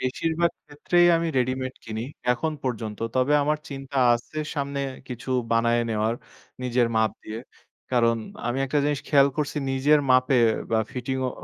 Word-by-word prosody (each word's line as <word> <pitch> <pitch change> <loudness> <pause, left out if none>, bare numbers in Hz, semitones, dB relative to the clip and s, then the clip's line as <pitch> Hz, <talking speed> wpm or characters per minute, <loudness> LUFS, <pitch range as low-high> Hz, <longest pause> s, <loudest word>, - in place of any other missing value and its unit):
বেশিরভাগ 165 +6 0 0.2
ক্ষেত্রেই 175 +4 +2
আমি 165 0 -1
রেডিমেড 130 +1 -1
কিনি 110 0 -4 0.3
এখন 155 +6 -2
পর্যন্ত। 110 -4 -3 0.2
তবে 130 +3 +2
আমার 150 +1 +1
চিন্তা 135 0 -7 0.2
আসে 120 +6 -6 0.2
সামনে 140 -1 -2 0.3
কিছু 125 +1 -6 0.2
বানায় 115 +1 +3
নেয়ার 110 +1 0 0.5
নিজের 125 -1 +2
মাপ 110 0 +3
দিয়ে। 110 +1 -6 0.5
কারণ 115 -2 +3 0.3
আমি 120 +2 -1
একটা 145 +3 0
জিনিস 145 -2 0
খেয়াল 140 -1 +5
করসি 150 0 -1
নিজের 145 +3 +4
মাপের 130 -2 +5 0.2
বা 110 - +3
ফিটিং 130 +1 -3
ও - - -3
130 Hz, 150 wpm, -25 LUFS, 120-145 Hz, 0.5 s, খেয়াল